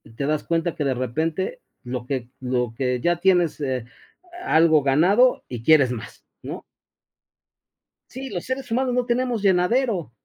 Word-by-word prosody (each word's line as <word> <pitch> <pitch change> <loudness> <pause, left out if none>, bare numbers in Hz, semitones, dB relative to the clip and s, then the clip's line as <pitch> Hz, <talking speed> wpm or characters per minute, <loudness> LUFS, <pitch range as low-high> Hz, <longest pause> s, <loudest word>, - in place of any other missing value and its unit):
Te 140 - -3
das 150 +1 0
cuenta 165 0 -1
que, 150 - -2
de 135 - +1
repente 160 - -2 0.2
lo 125 -1 -5
que 125 -2 -4
lo 125 -2 -1
que 125 -2 0
ya 175 +4 +1
tienes, 175 -3 +2
eh, 130 -4 -2 0.6
algo 160 -2 +4
ganado 185 - +3
y 120 -3 -7
quieres 140 -3 +5
más, 115 -3 -8 0.2
¿no? - - -7 1.5
Sí, 265 +1 -7
los 175 -3 -4
seres 260 0 -4
humanos 250 +1 +1
no 250 -1 +1
tenemos 245 -1 0
llenadero. 195 - +1
160 Hz, 150 wpm, -23 LUFS, 130-215 Hz, 1.5 s, quieres